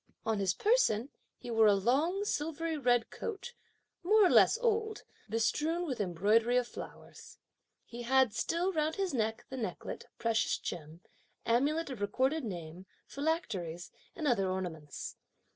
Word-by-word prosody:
On 220 Hz, -2 st, 0 dB
his 190 Hz, -2 st, +1 dB
person, 285 Hz, -, +2 dB, 0.3 s
he 245 Hz, -, -8 dB
wore 225 Hz, -1 st, +5 dB
a 205 Hz, -, +6 dB
long 295 Hz, -, +1 dB
silvery 325 Hz, -1 st, -2 dB
red 245 Hz, -5 st, +2 dB
coat, 455 Hz, +2 st, -6 dB, 0.5 s
more 420 Hz, +3 st, +5 dB
or -, -, +4 dB
less -, -, +6 dB
old, 440 Hz, -2 st, 0 dB, 0.3 s
bestrewn 305 Hz, +10 st, 0 dB
with 260 Hz, -9 st, -2 dB
embroidery 210 Hz, +7 st, +2 dB
of 250 Hz, -1 st, +1 dB
flowers. -, -, -11 dB, 0.5 s
He 240 Hz, 0 st, -8 dB
had 260 Hz, -1 st, +3 dB
still 340 Hz, -, 0 dB
round 310 Hz, -1 st, 0 dB
his 385 Hz, -5 st, -1 dB
neck 225 Hz, -2 st, -1 dB
the 265 Hz, -, -5 dB
necklet, 225 Hz, -4 st, -5 dB
precious 230 Hz, -1 st, +1 dB
gem, 160 Hz, 0 st, -7 dB, 0.4 s
amulet 285 Hz, +6 st, +1 dB
of 240 Hz, -6 st, -7 dB
Recorded 265 Hz, +9 st, +1 dB
Name, 175 Hz, -3 st, -7 dB, 0.2 s
philacteries, 200 Hz, -, -3 dB, 0.2 s
and 320 Hz, -6 st, -2 dB
other 195 Hz, -7 st, +2 dB
ornaments. 170 Hz, -6 st, -5 dB
245 Hz, 145 wpm, -32 LUFS, 205-325 Hz, 0.5 s, a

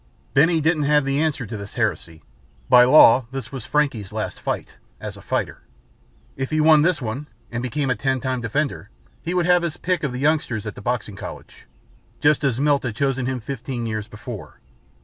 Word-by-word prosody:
Benny 160 Hz, +4 st, +4 dB
didn't 155 Hz, -1 st, +2 dB
have 150 Hz, -2 st, +4 dB
the 135 Hz, +1 st, 0 dB
answer 150 Hz, -5 st, -1 dB
to 110 Hz, -, -7 dB
this 100 Hz, 0 st, -9 dB
heresy. 85 Hz, -, -2 dB, 0.5 s
By 125 Hz, 0 st, +8 dB
law 125 Hz, -3 st, +7 dB
this 135 Hz, 0 st, -6 dB
was 135 Hz, -2 st, -7 dB
Frankie's 135 Hz, -10 st, 0 dB
last -, -, -4 dB
fight -, -, -4 dB, 0.2 s
as -, -, -6 dB
a -, -, -12 dB
fighter. -, -, -3 dB, 0.7 s
If 135 Hz, 0 st, -3 dB
he 155 Hz, -, 0 dB
won 155 Hz, -1 st, +6 dB
this 165 Hz, -3 st, +1 dB
one 125 Hz, +6 st, -4 dB, 0.2 s
and 120 Hz, 0 st, -3 dB
became 130 Hz, +2 st, -1 dB
a -, -, +1 dB
Ten 130 Hz, +3 st, 0 dB
Time 130 Hz, -1 st, -2 dB
Defender 120 Hz, -2 st, -2 dB, 0.3 s
he 175 Hz, +2 st, -3 dB
would 175 Hz, -1 st, +2 dB
have 180 Hz, 0 st, +4 dB
his 170 Hz, -1 st, -3 dB
pick 180 Hz, -3 st, -1 dB
of 140 Hz, -, -2 dB
the 125 Hz, -, -5 dB
youngsters 140 Hz, -7 st, 0 dB
at 105 Hz, -, -4 dB
the -, -, -11 dB
Boxing 120 Hz, -4 st, -2 dB
College, -, -, -10 dB, 0.5 s
just 150 Hz, 0 st, +3 dB
as 130 Hz, -3 st, +1 dB
Milt 145 Hz, -1 st, +3 dB
had 120 Hz, -4 st, -4 dB
chosen 135 Hz, -1 st, 0 dB
him 130 Hz, -1 st, -2 dB
fifteen 125 Hz, 0 st, -5 dB
years 110 Hz, -2 st, -3 dB
before. 105 Hz, -, -9 dB
135 Hz, 200 wpm, -22 LUFS, 120-150 Hz, 0.7 s, By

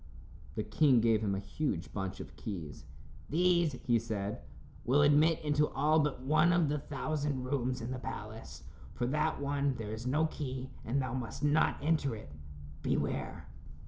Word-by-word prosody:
The 110 Hz, -, -1 dB
king 125 Hz, +4 st, +4 dB
gave 110 Hz, -1 st, +3 dB
him 100 Hz, -2 st, 0 dB
a -, -, -2 dB
huge 100 Hz, -, -3 dB
bunch 95 Hz, -1 st, -3 dB
of -, -, -9 dB
keys. 80 Hz, -8 st, -6 dB, 0.4 s
"These," 170 Hz, 0 st, +3 dB
he 120 Hz, -2 st, +4 dB
said, 105 Hz, -2 st, -3 dB, 0.4 s
"will 135 Hz, +5 st, +4 dB
admit 150 Hz, +3 st, +5 dB
into 150 Hz, 0 st, +2 dB
all 155 Hz, +3 st, +2 dB
but 145 Hz, -4 st, 0 dB
one 155 Hz, +5 st, +4 dB
of 170 Hz, -3 st, +3 dB
the 150 Hz, 0 st, 0 dB
thousand 145 Hz, -1 st, -2 dB
rooms 130 Hz, -1 st, -1 dB
in 115 Hz, +2 st, -4 dB
the 130 Hz, -, -3 dB
palace. 110 Hz, -, -7 dB, 0.3 s
For 120 Hz, -, -1 dB
that 150 Hz, +4 st, 0 dB
one 140 Hz, -1 st, 0 dB
there 110 Hz, -2 st, -5 dB
is 115 Hz, +3 st, -5 dB
no 150 Hz, +5 st, +2 dB
key, 130 Hz, -4 st, -4 dB
and 130 Hz, +5 st, 0 dB
thou 130 Hz, -1 st, -2 dB
must 125 Hz, 0 st, -4 dB
not 150 Hz, +1 st, +3 dB
enter 150 Hz, -5 st, +1 dB
it. 90 Hz, -9 st, -10 dB, 0.5 s
Beware." -, -, -2 dB
130 Hz, 170 wpm, -32 LUFS, 110-150 Hz, 0.5 s, admit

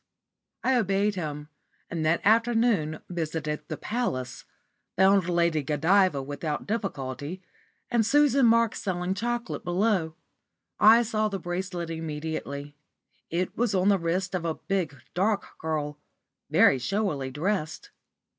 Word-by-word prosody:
I 260 Hz, -1 st, +3 dB
obeyed 205 Hz, -1 st, +1 dB
him, 150 Hz, -5 st, -5 dB, 0.4 s
and 165 Hz, -2 st, -3 dB
that 165 Hz, +2 st, +2 dB
afternoon 225 Hz, -8 st, +2 dB
visited 160 Hz, -3 st, -3 dB
the -, -, -4 dB
Palace, 130 Hz, -, -3 dB, 0.5 s
found 190 Hz, -1 st, +4 dB
Lady 170 Hz, -3 st, +2 dB
Godiva 155 Hz, +2 st, +2 dB
without 145 Hz, +2 st, -4 dB
difficulty, 175 Hz, -, -4 dB, 0.5 s
and 235 Hz, -2 st, +3 dB
Susan 275 Hz, +1 st, +4 dB
Marks 230 Hz, -1 st, +3 dB
selling 180 Hz, -1 st, -1 dB
chocolate 240 Hz, +4 st, -3 dB
below. 175 Hz, -3 st, 0 dB, 0.6 s
I 225 Hz, +3 st, +7 dB
saw 215 Hz, -1 st, 0 dB
the 200 Hz, -, -3 dB
bracelet 175 Hz, -1 st, -4 dB
immediately. 150 Hz, -2 st, -5 dB, 0.5 s
It 175 Hz, +2 st, -2 dB
was 235 Hz, -4 st, 0 dB
on 185 Hz, +2 st, +3 dB
the 200 Hz, -2 st, +4 dB
wrist 180 Hz, +3 st, -1 dB
of 180 Hz, -2 st, -2 dB
a 165 Hz, -2 st, -1 dB
big, 175 Hz, -8 st, -3 dB
dark 200 Hz, +3 st, +1 dB
girl, 150 Hz, -2 st, -3 dB, 0.5 s
very 135 Hz, -, +5 dB
showily 165 Hz, -, -1 dB
dressed. 180 Hz, -, -3 dB
180 Hz, 125 wpm, -27 LUFS, 155-210 Hz, 0.6 s, I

